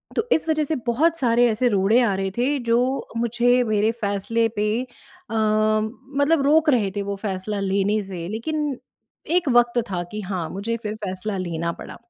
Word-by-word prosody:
तो 450 - 0
इस 320 - +2
वजह 310 -1 +2
से 310 +2 -1
बहुत 320 +8 +2
सारे 245 -2 +3
ऐसे 230 +3 +1
रोड़े 205 +4 +3
आ 205 -4 +2
रहे 195 0 -2
थे, 275 +4 +1
जो 245 +3 0
मुझे 240 +2 +2
मेरे 215 0 +1
फ़ैसले 205 +3 0
पे 210 +1 +1 0.6
अ, - - -6
मतलब 220 +8 +1
रोक 315 +2 +4
रहे 215 -8 +2
थे 205 - -1
वो 200 0 -3
फ़ैसला 200 0 -4
लेने 200 +2 +1
से। 180 -3 -6
लेकिन 290 +5 -2 0.6
एक 330 -6 0
वक़्त 240 0 +4
था 175 -1 -1
कि 210 0 -4
हाँ, 185 -4 -4
मुझे 225 +5 -3
फिर 210 0 -3
फ़ैसला 190 +2 -3
लेना 170 -2 -2
पड़ा। - - -10
220 Hz, 180 wpm, -23 LUFS, 200-250 Hz, 0.6 s, रोक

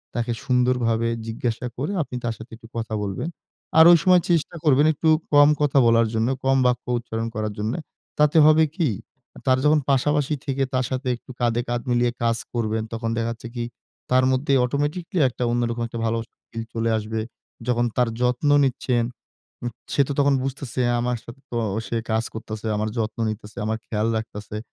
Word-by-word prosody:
তাকে 120 0 -1
সুন্দরভাবে 125 -2 +2 0.2
জিজ্ঞাসা 115 +1 -3
করে 145 +8 -2
আপনি 125 - -8
তার 115 -1 -1
সাথে 110 +2 -12
একটু 115 - -15
কথা 115 -1 -3
বলবেন। 100 - -3 0.5
আর 160 - +9
ঐ - - +9
সময় 180 -1 +6
চেষ্টা 170 0 +1
করবেন 145 -1 +5
একটু 160 +2 +1 0.2
কম 145 0 +8
কথা 145 -1 +2
বলার 115 0 +4
জন্য, 110 +1 +1 0.2
কম 135 0 +4
বাক্য 125 0 +1
উচ্চারণ 115 -1 -4
করার 110 -1 -2
জন্যে। 110 +9 -2 0.4
তাতে 150 +1 +4
হবে 155 +1 +6
কি? 170 -7 +1 0.6
তার 130 -1 +4
যখন 150 +1 +5
পাশাপাশি 145 +2 +2
থেকে 135 -1 0
তার 130 -1 +1
সাথে 130 0 -2
একটু 120 - -13
কাঁধে 120 0 +2
কাঁধ 120 0 -1
মিলিয়ে 120 0 +2
কাজ 115 -1 +2 0.2
করবেন, 110 -2 -1
তখন 115 0 -2
দেখা 115 0 0
যাচ্ছে 115 +1 -8
কি? 120 -1 -2 0.5
তার 130 0 +5
মধ্যে 135 +2 +1
অটোমেটিক্যালি 145 +6 -1
একটা 125 - -5
অন্যরকম 120 0 -1
একটা 115 0 -6
ভালো 115 0 +1 0.3
ফিল 115 0 -5
চলে 115 0 0
আসবে। 110 +1 -3 0.5
যখন 120 -1 +2
তার 125 -2 +3
যত্ন 125 +4 +1 0.2
নিচ্ছেন, 125 -2 0 0.6
উ - - 0 0.3
সে - - +4
তো - - -3
তখন 140 0 +4
বুঝতেছে 135 -1 -3 0.2
আমার 120 0 0
সাথে 120 +3 -12
তো 120 - -2 0.3
সে 115 - -1
কাজ 110 +1 +1
করতেছে, 110 0 -6
আমার 110 +1 -1
যত্ন 110 0 -2
নিতেছে, 105 0 -7
আমার 110 +1 -1
খেয়াল 105 0 0
রাখতেছে। 105 -1 -6
120 Hz, 180 wpm, -23 LUFS, 115-135 Hz, 0.6 s, আর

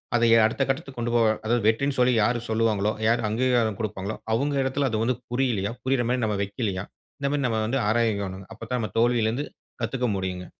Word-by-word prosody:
அத 120 - +2 0.2
அடுத்த 110 +5 -1
கட்டத்துக்கு 135 -1 -3
கொண்டு 120 0 -1
போக 115 -1 +4 0.2
அதாவது 115 -1 +1
வெற்றினு 140 +5 +1
சொல்லி 125 0 +4
யாரு 120 +2 +1
சொல்வாங்களோ, 110 -2 +1 0.2
யார் 115 0 +2
அங்கீகாரம் 115 -2 +1
கொடுப்பாங்களோ 105 -1 -4 0.2
அவங்க 140 +5 +1
இடத்துல 135 0 0
அது 110 0 0
வந்து 125 +2 +1 0.2
புரியலியா? 120 -5 0
புரியிற 130 -2 +1
மாரி 125 -1 0
நம்ம 105 -2 -1
வைக்கலியா? 100 -2 -3 0.3
இந்த 140 0 0
மாரி 145 -1 0
நம்ம 110 -2 0
வந்து 135 +4 0
ஆராயவேனும். 100 -4 0
அப்ப 110 - -17
தான் 125 -1 0
நம்ம 110 - -3
தோல்வியில 120 -1 +3
இருந்து 135 +6 -2 0.4
கத்துக்க 125 -2 -1
முடியுங்க. 95 -1 -3
115 Hz, 195 wpm, -25 LUFS, 110-125 Hz, 0.4 s, போக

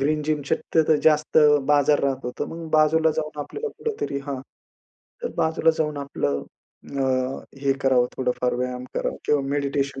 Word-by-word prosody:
Green 150 +2 +1
gym 150 -1 -1
शक्यतो 160 +1 +2
जास्त 155 0 +4 0.3
बाजार 145 0 +4
राहत 135 -1 -1
होतं. 125 - -3
मग 165 -1 -7
बाजूला 155 +1 +4
जाऊन 155 -1 -3
आपल्याला 440 - -5
कुठेतरी 425 - -3
हां, 140 -2 -3 0.8
तर - - -2
बाजूला 160 0 +3
जाऊन 150 -1 0
आपलं 70 - -2 0.6
अ, - - +1 0.6
हे 140 -1 +3
करावं, 130 -2 +4
थोडंफार 125 -1 0
व्यायाम 125 0 -3
करावा - - -2
किंवा 150 -1 +3
मेडिटेशन 140 -1 -1
145 Hz, 150 wpm, -24 LUFS, 135-155 Hz, 0.8 s, जास्त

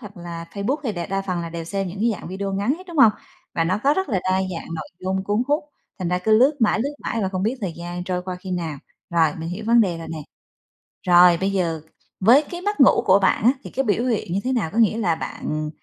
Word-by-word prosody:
hoặc 205 -5 -11
là 170 -1 -7
Facebook 210 +8 -1
hay 225 - -1
đè 175 -3 -4
đa 195 0 -2
phần 185 -3 -2
là 170 - -5
đều 165 0 -6
xem 195 +2 -3
những 185 +3 -8
cái 235 +2 +3
dạng - - -9
video 195 +2 -4
ngắn 200 +7 0
hết, 370 - -13
đúng 345 -2 -8
hông? 225 -5 +7 0.4
Và 165 - +1
nó 185 +4 0
có 285 +2 +4
rất 380 +2 -1
là 195 - +1
đa 185 0 +1
dạng 180 -3 -5
nội 155 -2 -6
dung 190 +1 -2
cuốn 205 +4 +1
hút, 295 +2 +1 0.3
thành 180 -3 -2
ra 180 +1 +1
cứ 215 +4 +3
lướt 265 +5 +5
mãi, 225 -2 +2
lướt 280 +5 -2
mãi 230 - -2
và 190 - 0
không 185 -1 -3
biết 225 +5 0
thời 190 -5 -3
gian 175 +1 -6
trôi 180 -1 -2
qua 180 0 -5
khi 185 - -8
nào. 165 -5 -3 0.3
Rồi 165 -2 +4
mình 160 +1 -5
hiểu 185 +5 -5
vấn 235 +1 +5
đề 180 -6 +1
rồi 165 - -7
nè. 165 - -5 0.9
Rồi, 175 -1 +7
bây 195 +1 +1
giờ 170 -5 -1 0.4
với 240 +10 +6
cái 350 0 -5
mất 410 0 -2
ngủ 265 - +6
của 190 +1 +6
bạn 195 - +2
á, 240 - +6
thì - - -8
cái 270 - -1
biểu 220 +2 +1
hiện 225 -8 -1
như 195 - +1
thế 260 - 0
nào? 220 -10 0
Có - - -4
nghĩa 225 -1 +4
là 175 -8 +1
bạn 155 -1 -4
190 Hz, 275 wpm, -22 LUFS, 175-225 Hz, 0.9 s, hông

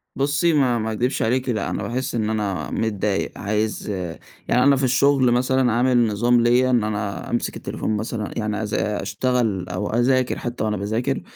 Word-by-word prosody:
بُصي 145 +4 +1
ما 130 -5 +3
ما 110 0 -2
اكدبش 120 +4 -1
عليكِ 125 +3 0
لأن 115 - 0
أنا - - -3
باحس 125 +1 -3
إن 110 -2 0
أنا 105 -3 -2
متضايق، 105 -2 -1
عايز 105 +1 -2 0.6
يعني 125 - +3
أنا 140 +1 +5
في 135 - -2
الشغل 130 0 +3
مثلًا 125 0 +2
عامل 120 0 +3
نظام 120 +3 +2
ليّا، 120 +2 +3
إن 120 -3 +3
أنا 105 -1 -3
أمسك - - -2
التليفون 110 - -3
مثلًا 110 0 -4
يعني 105 0 -2
أذا 105 0 -1
أشتغل 110 -4 -1
أو 90 +3 -3
أذاكر 125 +2 +2
حتى 120 -1 -4
وأنا 105 -1 -1
باذاكر 110 +5 -1
120 Hz, 175 wpm, -22 LUFS, 105-125 Hz, 0.6 s, أنا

